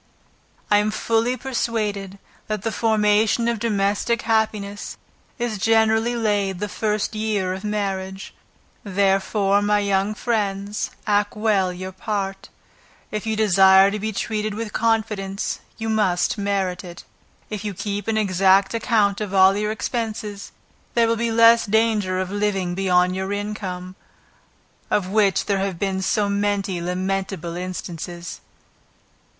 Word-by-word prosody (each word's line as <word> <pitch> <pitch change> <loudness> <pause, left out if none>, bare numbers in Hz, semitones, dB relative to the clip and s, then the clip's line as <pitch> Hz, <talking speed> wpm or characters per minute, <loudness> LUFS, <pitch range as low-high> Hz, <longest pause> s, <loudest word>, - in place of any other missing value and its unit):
I 205 - +6
am 210 +1 +1
fully 230 +3 0
persuaded 215 -7 -2 0.3
that 215 -2 -3
the 225 - -1
formation 220 +1 +2
of 235 -2 0
domestic 210 +1 0
happiness, 215 -2 -1 0.4
is 235 -4 -2
generally 225 +2 +3
laid 205 -4 0
the 210 +3 -3
first 210 +1 -1
year 215 -4 -1
of 190 +2 -7
marriage: 195 -2 -3 0.5
therefore, 195 0 +2
my 210 0 +2
young 200 0 0
friends, 205 -2 -2 0.2
act 205 0 +1
well 205 -4 +2
your 185 +1 -6
part; 195 0 -4 0.6
if 215 +1 -4
you 220 - 0
desire 195 -2 +6
to 210 - -3
be 220 +2 -2
treated 215 0 -2
with 220 -1 -5
confidence 215 -3 -1 0.2
you 225 - -4
must 205 -5 +1
merit 200 -3 -1
it. 175 -1 -10 0.5
If 210 -1 -4
you 205 -2 -4
keep 200 +1 -4
an 220 -1 +1
exact 195 -1 +3
account 220 -3 +1
of 200 -2 -3
all 190 0 +6
your 210 +1 -1
expenses, 215 -3 -4 0.4
there 230 -1 +4
will 230 - +2
be 230 +1 -1
less 230 0 +6
danger 210 -3 +1
of 185 0 -3
living 200 -3 -1
beyond 180 -1 +2
your 190 +1 -3
income, 195 -3 -4 0.9
of 185 -3 0
which 200 -1 +2
there 200 -1 0
have 195 -2 -2
been 190 0 -1
so 205 +2 +1
many 200 -2 -1
lamentable 185 -1 -3
instances. 175 -1 -6
205 Hz, 135 wpm, -22 LUFS, 190-220 Hz, 0.9 s, I